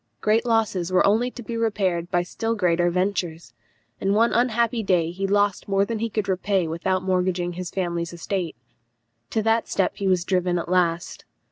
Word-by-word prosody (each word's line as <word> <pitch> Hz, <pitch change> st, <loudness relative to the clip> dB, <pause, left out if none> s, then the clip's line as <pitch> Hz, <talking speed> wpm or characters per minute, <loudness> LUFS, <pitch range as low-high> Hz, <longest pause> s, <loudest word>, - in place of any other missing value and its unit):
Great 225 Hz, +3 st, +2 dB
losses 210 Hz, -6 st, +1 dB
were 185 Hz, -, +4 dB
only 225 Hz, +5 st, +3 dB
to 245 Hz, -1 st, -10 dB
be 230 Hz, +2 st, -5 dB
repaired 195 Hz, -7 st, 0 dB
by 175 Hz, -1 st, +1 dB
still 225 Hz, +5 st, -2 dB
greater 175 Hz, -3 st, +2 dB
ventures, 175 Hz, -6 st, -2 dB, 0.5 s
and 195 Hz, +1 st, +1 dB
one 230 Hz, +2 st, +3 dB
unhappy 235 Hz, -1 st, +1 dB
day 175 Hz, -5 st, +1 dB
he 195 Hz, +2 st, -3 dB
lost 205 Hz, 0 st, +1 dB
more 195 Hz, 0 st, +2 dB
than 225 Hz, 0 st, -3 dB
he 230 Hz, +1 st, -1 dB
could 215 Hz, -1 st, -2 dB
repay 190 Hz, -1 st, 0 dB
without 185 Hz, +3 st, -1 dB
mortgaging 180 Hz, -1 st, 0 dB
his 180 Hz, 0 st, -5 dB
family 175 Hz, -3 st, -2 dB
estate. 170 Hz, +1 st, -3 dB, 0.7 s
To 220 Hz, -, -1 dB
that 225 Hz, +1 st, +2 dB
step 195 Hz, -, 0 dB
he 200 Hz, -, -2 dB
was 180 Hz, -2 st, +2 dB
driven 180 Hz, -2 st, +1 dB
at 170 Hz, -, -4 dB
last. 175 Hz, -2 st, 0 dB
190 Hz, 180 wpm, -24 LUFS, 175-215 Hz, 0.7 s, were